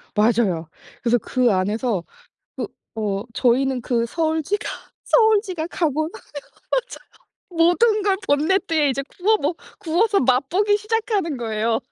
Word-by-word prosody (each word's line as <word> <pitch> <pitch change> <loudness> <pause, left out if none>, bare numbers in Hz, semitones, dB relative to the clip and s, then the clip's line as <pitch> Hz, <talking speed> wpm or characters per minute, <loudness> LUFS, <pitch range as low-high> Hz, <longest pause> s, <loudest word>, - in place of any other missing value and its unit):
맞아요. 210 -7 +2 0.3
그래서 245 0 +3
그 250 0 +1
안에서 205 +1 0 0.5
그 - - -3 0.3
어 200 -3 -1
저희는 260 +1 +2
그 235 -1 0
서울쥐가 320 - -1 0.4
서울쥐가 405 -7 +2
가고 310 -3 -1
나면 445 - -13 0.5
맞아요. - - -3 0.4
모든 360 +6 +3
걸 395 -1 +2
본네트에 315 0 +2
이제 275 +2 -2
구워 425 +4 +1
먹 325 -2 -2 0.2
구워서 395 +6 +1
맛 260 +1 +2
보기 410 +3 +2
시작하는 425 - -1
거예요. 225 -1 -1
310 Hz, 280 characters per minute, -22 LUFS, 235-395 Hz, 0.5 s, 그래서